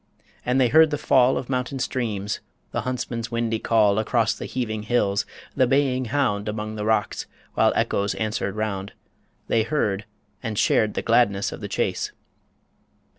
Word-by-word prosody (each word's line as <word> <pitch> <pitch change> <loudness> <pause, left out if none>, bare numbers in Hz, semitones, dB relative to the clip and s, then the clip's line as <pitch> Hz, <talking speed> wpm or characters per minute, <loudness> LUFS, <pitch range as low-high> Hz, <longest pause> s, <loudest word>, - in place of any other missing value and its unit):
And 125 +2 +1
they 125 -2 +4
heard 160 +5 +6
the 150 - -1
fall 130 -2 +4
Of 125 - -4
mountain 130 +1 -2
streams, 110 -6 -2 0.3
the - - -1
huntsman's 120 -2 -3
windy 115 -1 -1
call 110 -3 +3
Across 110 0 +2
the - - -7
heaving 110 -4 -3
hills, 105 -3 +1 0.3
the 130 -2 +4
baying 130 -1 +2
hound 110 -5 0
Among 105 0 -4
the 105 -1 -4
rocks, 110 0 0 0.3
while - - +4
echoes 100 0 0
answered 110 -2 -2
round 100 -2 -3 0.5
They 115 - +3
heard, 110 -6 0 0.4
and 110 -2 -4
shared 105 +1 +2
the - - -2
gladness 115 -4 +3
of - - -8
the - - -4
chase. - - -1
115 Hz, 160 wpm, -24 LUFS, 105-125 Hz, 0.5 s, heard